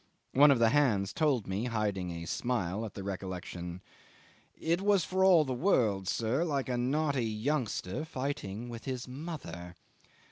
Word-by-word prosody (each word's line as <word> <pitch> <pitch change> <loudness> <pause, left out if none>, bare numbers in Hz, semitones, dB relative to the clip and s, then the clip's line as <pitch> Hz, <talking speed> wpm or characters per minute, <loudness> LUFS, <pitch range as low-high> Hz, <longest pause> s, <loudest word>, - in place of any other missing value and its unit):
One 145 +3 +7
of 140 - +5
the 115 -1 +4
hands 110 -8 +2
told 140 - +1
me, 95 +5 -2
hiding 105 -6 -1
a 85 -1 -5
smile 105 0 -1
at - - -13
the 100 - -6
recollection, 90 -2 -5 0.8
"It 170 +3 +1
was 200 -4 +3
for 190 0 +1
all 175 -5 +6
the 130 - -2
world, 115 - +2
sir, 115 - +1
like 140 -6 -1
a 125 - 0
naughty 135 0 +1
youngster 110 -1 -2
fighting 130 -7 -4
with 115 -1 -8
his 130 -2 -4
mother." 125 - -7
120 Hz, 155 wpm, -31 LUFS, 100-145 Hz, 0.8 s, One